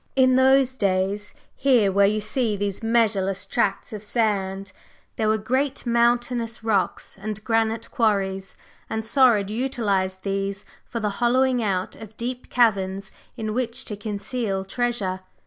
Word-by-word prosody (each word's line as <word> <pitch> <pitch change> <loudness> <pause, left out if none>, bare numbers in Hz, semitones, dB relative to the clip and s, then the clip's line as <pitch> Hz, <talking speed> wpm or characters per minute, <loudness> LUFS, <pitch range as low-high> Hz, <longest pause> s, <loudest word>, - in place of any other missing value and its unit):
In 260 -1 +5
those 260 0 +4
days, 195 0 0 0.2
here 245 -7 +3
where 200 +1 +4
you 215 +1 +1
see 215 0 0
these 200 -1 -2
measureless 210 -4 +1
tracts 200 - -1
of 210 - -5
sand, 195 -3 -1 0.4
there 220 - 0
were 215 0 +3
great 260 +6 -1
mountainous 235 -1 +1
rocks 205 -3 -1
and 215 0 -5
granite 225 -1 0
quarries, 195 -5 0 0.3
and 220 0 -3
Saurid 225 -6 +4
utilized 205 -6 -1
these 195 0 -2 0.2
for 230 - -4
the 210 -2 0
hollowing 255 +1 +3
out 190 -4 -1
of 220 -1 -12
deep 245 +1 -5
caverns 195 -5 +1 0.3
in 215 -2 -3
which 245 +1 -2
to 210 - -3
conceal 205 -1 -3
treasure. 210 -4 -1
215 Hz, 140 wpm, -24 LUFS, 195-240 Hz, 0.4 s, In